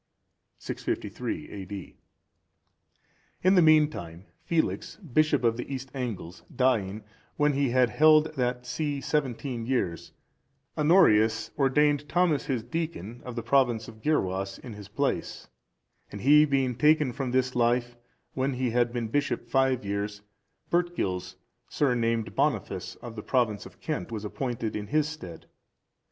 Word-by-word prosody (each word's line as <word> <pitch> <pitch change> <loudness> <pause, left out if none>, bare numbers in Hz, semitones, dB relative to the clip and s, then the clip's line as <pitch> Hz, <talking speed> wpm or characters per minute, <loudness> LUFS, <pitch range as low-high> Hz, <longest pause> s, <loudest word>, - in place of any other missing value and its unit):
[653 - - -4
A.D.] 95 0 -8 1.5
In 185 +1 +5
the 180 - +6
meantime, 150 - +2 0.2
Felix, 165 -1 -1
bishop 155 - +1
of 115 -1 +2
the 125 - -6
East 135 -1 -5
Angles, 110 -10 -5
dying, 110 -6 +1 0.3
when 150 0 +3
he 140 -1 +1
had 125 0 +3
held 155 0 +5
that 125 -2 -1
see 145 +3 -2
seventeen 130 -4 -2
years,(393) 100 - -5
Honorius 110 - +4
ordained 145 +1 +2
Thomas 175 -4 +2
his 125 -6 -1
deacon, 120 - -5
of 125 -2 -7
the 115 - -3
province 120 -3 +2
of 110 -1 -12
the 150 - -1
Gyrwas,(394) 95 -9 -1
in 120 - -8
his 105 -2 -10
place; 100 - -2 0.6
and 100 - -7
he 150 +3 +7
being 135 -3 +1
taken 150 +1 +3
from 135 +1 -3
this 130 0 +1
life 120 0 +1 0.4
when 130 +1 0
he 125 -1 -1
had 120 0 +2
been 120 -2 -2
bishop 140 0 -1
five 130 -2 +1
years, 100 +1 -3 0.5
Bertgils, 170 - -1 0.3
surnamed 115 -5 0
Boniface,(395) - - -2
of 115 -2 -8
the 105 - -5
province 115 -4 0
of - - -19
Kent, 90 - -4
was 110 -2 -4
appointed 115 0 -3
in 105 -1 -4
his 150 +3 +1
stead. 90 - -9
125 Hz, 140 wpm, -27 LUFS, 110-145 Hz, 1.5 s, he